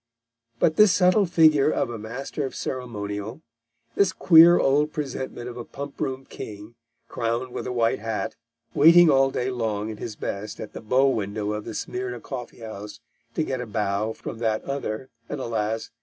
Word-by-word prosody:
But 155 +6 +2
this 210 -2 +7
subtle 185 +2 +4
figure 155 -4 +5
of 120 - 0
a 115 - -6
Master 125 +7 -5
of 135 - -4
Ceremonial; 110 0 -5 0.5
this 200 +4 +3
queer 170 0 +7
old 150 +3 +2
presentment 130 -4 -5
of 125 0 -7
a 120 - -5
pump 140 +3 -8
room 130 0 -3
king, 105 -1 -9 0.3
crowned 120 +2 -2
with - - -4
a - - -3
white 115 -2 +1
hat, 110 0 -3 0.4
waiting 165 +2 +7
all 135 0 +4
day 130 -1 -2
long 110 -3 -2
in 110 - -8
his 110 0 -6
best 105 0 -5
at 105 - -7
the - - -7
bow 130 +5 +3
window 105 -4 -1
of 105 0 -5
the - - -6
Smyrna 125 -1 -4
Coffee 120 -1 -8
House 105 -2 -8 0.4
to 160 - +1
get 130 -4 -3
a 125 - -6
bow 105 +1 -1
from 115 - -8
that 110 -2 0
other, 135 -3 -4 0.2
and 150 - -4
alas! 110 -2 -2
125 Hz, 180 wpm, -25 LUFS, 110-140 Hz, 0.5 s, this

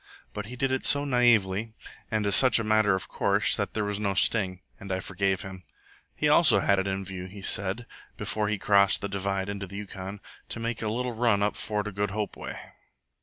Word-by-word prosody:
But 105 0 -5
he 125 - -8
did 135 +1 -1
it 130 - -1
so 145 0 +4
naively 115 -5 +2 0.4
and 110 -1 -1
as 100 -1 +3
such 130 +2 +6
a 115 - -1
matter 110 -2 +3
of 95 - -5
course, - - +2
that - - -3
there 105 - 0
was 105 0 -2
no 100 -2 -1
sting, 95 -2 +1 0.2
and 100 -1 -8
I 95 - -1
forgave 95 0 -1
him. 95 -1 -9 0.5
He - - 0
also - - +6
had 100 -1 +2
it 95 - -1
in 95 0 -3
view, 95 -1 -6
he 100 +1 -11
said, 100 +5 0 0.3
before 105 -1 -2
he 105 - -1
crossed 100 0 +3
the 100 - -2
divide 100 0 -2
into 100 -1 -5
the 100 +2 -9
Yukon, 100 -1 -7 0.3
to - - -4
make 115 0 -3
a 110 - -2
little 125 +3 -2
run 110 -3 +2
up 105 - 0
Fort 105 -1 -3
o' - - -4
Good 100 +1 -2
Hope 105 +1 -4
way. - - -7
100 Hz, 220 wpm, -27 LUFS, 95-110 Hz, 0.5 s, such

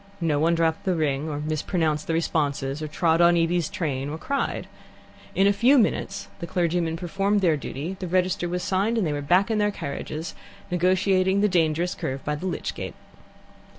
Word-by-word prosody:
No 160 -4 +1
one 165 +2 +3
dropped 165 -1 +1
the 185 -2 +1
ring 150 -1 0
or 145 -1 -3
mispronounced 155 0 -1
the 165 - 0
responses, 145 -3 -1
or 155 - -3
trod 160 +2 +2
on 170 0 +6
Evie's 170 -1 +1
train, 145 -7 -2
or 155 - -4
cried. 275 +11 -2 0.7
In 195 - +4
a 200 - +5
few 245 +8 +5
minutes 100 - 0
the 170 - -5
clergymen 170 -1 0
performed 195 +4 0
their 170 -4 +3
duty, 150 +6 -5
the 185 - -4
register 180 0 0
was 180 +1 -2
signed, 200 +5 +1
and 215 - +1
they 150 - -1
were 145 - -2
back 180 +9 +3
in 215 - +1
their 210 0 +3
carriages, 155 -2 -5 0.4
negotiating 185 +2 +2
the 210 - +4
dangerous 170 -1 +1
curve 135 +1 -5
by 150 - 0
the 150 +6 -4
lych 180 - -3
gate. - - -6
170 Hz, 190 wpm, -25 LUFS, 155-185 Hz, 0.7 s, on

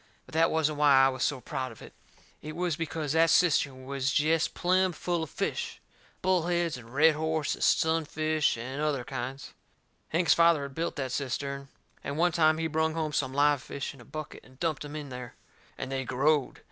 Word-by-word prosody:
But - - -17
that 165 +1 +4
wasn't 155 -2 0
why 140 -3 +6
I - - +4
was 130 -1 -5
so 145 -3 0
proud 130 +1 -4
of 115 - -14
it. - - -12 0.5
It 155 0 -7
was 175 -2 -1
because 160 -2 -3
that 165 +1 +4
cistern 145 -6 +2
was 135 0 -1
jest 160 +3 +2
plumb 185 +1 +2
full 175 +1 -2
of 160 - -4
fish - - -3 0.4
bullheads 175 -2 +1
and 120 -2 -11
red 155 +4 +5
horse 160 0 -1
and - - -4
sunfish 155 -2 +2
and 130 +5 -5
other 145 -4 0
kinds. 130 +2 -6 0.6
Hank's 170 +2 +3
father 170 -3 +4
had 140 -1 -7
built 165 +4 -2
that 130 -3 -3
cistern. 140 +1 -3 0.4
And 140 +2 -4
one 175 +2 +3
time 155 -1 +3
he 165 - -2
brung 160 0 0
home 155 -2 -2
some 130 -3 0
live 145 -1 +3
fish 140 +2 -5
in 135 - -15
a - - -12
bucket 155 +4 -8
and 130 +1 -20
dumped 160 -4 -1
em 145 0 -8
in 150 -2 -6
there. 125 -1 -8 0.4
And 130 - -5
they 135 0 -1
growed. 135 +3 +1
150 Hz, 200 wpm, -29 LUFS, 135-160 Hz, 0.6 s, why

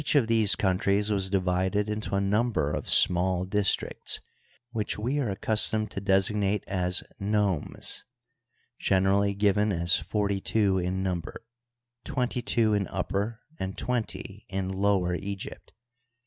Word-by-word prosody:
of 140 -5 +5
these 110 -2 +3
countries 100 +2 +1
was 95 -2 +2
divided 95 +2 0
into 105 -1 -3
a - - +2
number 105 -5 +1
of - - -4
small 90 +1 +4
dis 100 +1 +3
tricts, - - -4 0.5
which 110 -3 -2
we 125 +7 -1
are 125 -6 -1
accustomed 110 +1 +2
to 100 - -5
designate 100 +1 +1
as 90 -1 0 0.2
nomes, 100 -5 -1 0.8
generally 100 +1 +2
given 105 +1 +2
as 85 0 +3
forty 100 -2 -1
two 100 -4 +1
in 90 +1 -2
number, 90 +2 -4 0.6
twenty 125 -4 -2
two 115 -3 +2
in 100 -3 0
Upper 110 +4 -3 0.2
and 95 0 -4
twenty 110 -4 -4
in 95 -1 -3
Lower 95 -2 +1
Egypt. 100 +2 -6
100 Hz, 135 wpm, -27 LUFS, 95-105 Hz, 0.8 s, of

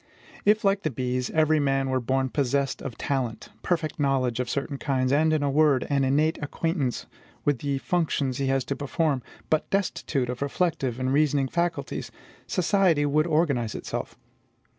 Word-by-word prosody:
If, 210 +1 +4
like 195 0 +2
the 155 - -1
bees, 125 -1 -2
every 155 -1 +3
man 135 -2 +1
were 130 - +2
born 130 +2 0
possessed 140 0 0
of 125 - -6
talent, 130 -5 -2
perfect 165 -2 -1
knowledge 130 -4 +1
of 125 -1 -1
certain 140 0 -3
kinds, 130 -2 0
and, 155 +3 +3
in 155 -2 +1
a 140 - +1
word, 145 -2 +3
an 140 -1 +2
innate 150 +5 +2
acquaintance 145 -3 -2 0.4
with 145 -4 +2
the 140 0 -1
functions 140 -5 0
he 135 - 0
has 135 0 +1
to 140 - -2
perform, 145 -1 0 0.3
but 155 - +1
destitute 170 -9 -1
of 125 +1 -4
reflective 140 -4 -1
and 130 +1 0
reasoning 145 -2 +2
faculties, 170 -4 -2 0.4
society 180 -5 +2
would 155 +3 +2
organize 140 -9 +1
itself. - - -5
140 Hz, 165 wpm, -26 LUFS, 130-155 Hz, 0.4 s, If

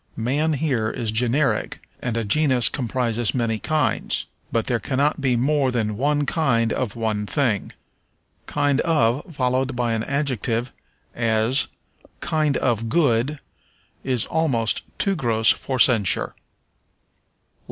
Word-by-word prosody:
Man 145 +7 0
here 130 -7 0
is 110 -1 -3
generic, 125 +6 0
and 120 -2 -2
a 115 - 0
genus 130 +2 +2
comprises 120 -3 -1
many 115 -3 0
kinds. 155 +4 0 0.3
But 115 -1 0
there 120 -2 0
cannot 140 +3 0
be 130 -3 +2
more 135 +2 +2
than 110 -4 -1
one 145 +5 +1
kind 120 -8 +1
of 120 -4 -3
one 110 -2 -2
thing. 120 -8 0 0.8
Kind 145 -1 +1
of 150 0 +1
followed 130 0 0
by 120 -1 0
an 110 -1 -1
adjective, 130 -4 -1 0.4
as, 115 +3 +2 0.5
"kind 155 -3 0
of 115 -1 0
good," 140 -2 +2 0.7
is 125 -4 0
almost 130 -9 0 0.2
too 195 -2 +1
gross 115 -7 +3
for 130 - -3
censure. 115 -6 +3
125 Hz, 125 wpm, -22 LUFS, 115-145 Hz, 0.8 s, gross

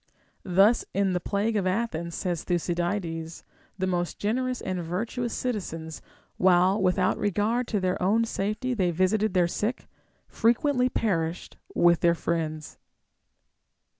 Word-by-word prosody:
* - - -41
Thus 195 +5 +4
in 195 -1 +2
the 180 - +1
plague 205 +5 -1
of 195 -3 +1
Athens, 185 -5 -2
says 175 -4 -2
Tlmcydides,f 175 -1 -2 0.3
the 190 - -1
most 175 -2 -1
generous 250 +4 -1
and 185 -1 -3
virtuous 225 +8 -3
citizens, 165 -10 -4 0.4
while 185 +2 +4
without 185 0 +2
regard 215 +5 0
to 210 - 0
their 185 -1 -1
oavu 215 +5 +3
safety 215 +4 -2
they 190 -6 +1
visited 190 +4 +1
their 175 -2 +4
sick, 215 +8 -3 0.4
frequently 250 +3 +2
perished 170 -8 -2 0.2
with 170 -1 +4
their 170 0 +3
friends. 155 -2 -3
190 Hz, 135 wpm, -26 LUFS, 175-220 Hz, 0.4 s, Thus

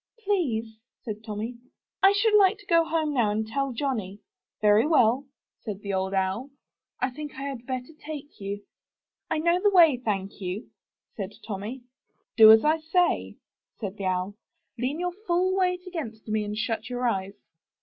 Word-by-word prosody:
*Tlease/' 230 - 0 0.3
said 215 -2 -6
Tommy, 220 +3 -5 0.4
'*I 390 - +7
should 425 +2 +2
like 405 0 +5
to 410 - -17
go 335 -2 +4
home 320 -2 -1
now 235 -6 +2
and 215 +1 -1
tell 275 +5 -2
Johnny/' 225 -7 -3 0.4
"Very 210 +5 +4
well," 265 -3 +3 0.3
said 205 -3 -6
the 200 -1 -3
Old 190 +1 -1
Owl, 190 +8 -1 0.5
'^I 255 0 0
think 300 -1 -7
I 270 - -6
had 270 -4 -6
better 255 +3 -4
take 295 -1 -8
you." 200 +1 -5 0.7
I - - 0
know 340 +3 +2
the 410 - +5
way, 335 -8 +6
thank 200 -2 -3
you," 185 +4 -5 0.5
said 200 -1 -4
Tommy. 215 +5 -5 0.5
'*Do 220 -1 +10
as 220 +5 +6
I 315 +1 +3
say," 350 +3 +1 0.4
said 200 -2 -5
the 195 - -4
Owl. 185 +1 -1 0.5
''Lean 265 +6 -1
your 355 0 -1
full 365 +2 +2
weight 360 -1 0
against 280 - -6
me 215 0 0
and 210 +1 -4
shut 225 +1 -2
your 245 0 -1
eyes." 195 -3 -2
245 Hz, 170 wpm, -26 LUFS, 210-315 Hz, 0.7 s, Do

